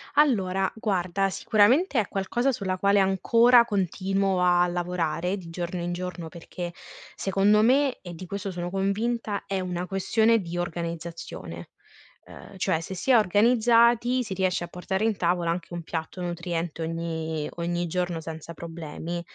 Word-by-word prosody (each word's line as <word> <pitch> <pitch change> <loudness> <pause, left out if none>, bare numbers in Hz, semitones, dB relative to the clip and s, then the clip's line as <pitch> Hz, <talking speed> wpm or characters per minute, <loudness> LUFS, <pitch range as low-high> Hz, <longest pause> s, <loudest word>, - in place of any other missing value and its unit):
Allora, 195 -10 +2
guarda, 195 -3 0
sicuramente 235 - +3
è 210 - 0
qualcosa 240 +7 0
sulla 190 -5 -2
quale 200 +1 +3
ancora 230 +5 +5
continuo 195 -2 0
a 175 0 +4
lavorare 175 +1 -1
di 170 -3 -10
giorno 175 +1 -4
in 175 - -2
giorno, 180 -1 -5
perché 175 +1 -7 0.4
secondo 200 +2 +3
me, 265 +4 +3
e 175 -1 -8
di 175 +3 -8
questo 200 +2 -4
sono 175 0 -4
convinta, 205 +2 -1
è 195 -1 -2
una 180 -1 -3
questione 220 +4 +2
di 175 -3 -5
organizzazione, 170 -1 -5 0.6
uhm, 195 - -13
cioè 185 -3 +1
se 190 - -6
si 195 +9 0
è 245 - +8
organizzati 235 +4 +4
si 210 -4 -5
riesce 185 -2 0
a - - -5
portare 190 +3 -3
in 225 -2 +1
tavola 170 -1 +1
anche 175 0 -5
un 175 -1 -5
piatto 160 +2 -5
nutriente 170 -1 -3
ogni 160 -2 -3
ogni 175 0 -2
giorno, 175 -1 -2
senza 160 +1 -8
problemi. 170 0 -6
Ehm, - - -4
185 Hz, 155 wpm, -26 LUFS, 175-205 Hz, 0.6 s, è